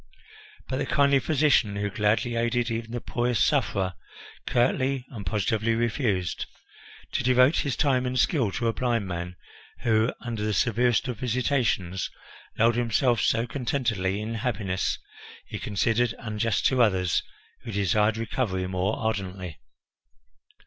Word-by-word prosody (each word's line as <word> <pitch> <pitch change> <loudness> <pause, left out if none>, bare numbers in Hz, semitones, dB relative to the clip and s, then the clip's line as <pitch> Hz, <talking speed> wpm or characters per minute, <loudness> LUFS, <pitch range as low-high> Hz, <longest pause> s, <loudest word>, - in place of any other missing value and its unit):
But 130 - -2
the - - -2
kindly 140 -1 +4
physician, 140 -8 +2
who 100 0 -2
gladly 105 +4 +1
aided 120 +1 0
even 115 0 -3
the 120 +1 -3
poorest 120 +1 +1
sufferer, 95 -2 +1 0.5
curtly 130 +1 +1
and 110 -6 -7
positively 110 +3 +1
refused. 115 - -1 0.6
To - - -1
devote 125 +4 +4
his 140 -5 0
time 130 -4 +2
and 125 0 -2
skill 125 - +2
to 120 - -2
a 115 - +1
blind 115 -4 0
man 90 0 -4 0.5
who, 110 +1 +2
under 115 -3 -5
the 105 -1 0
severest 120 +2 +2
of 125 -4 -4
visitations, 115 -7 0 0.5
lulled 115 +1 +3
himself 120 -1 +2
so 115 +1 +2
contentedly 115 -6 -1
in 110 +2 -4
happiness, 105 -5 -1 0.5
he - - -6
considered 115 +3 0
unjust 110 -1 -1
to 130 -2 +3
others 95 -6 +2 0.4
who 115 - -8
desired 105 +2 +2
recovery 110 -5 -2
more 95 +2 -1
ardently. 95 -6 -3
115 Hz, 135 wpm, -26 LUFS, 100-125 Hz, 0.6 s, kindly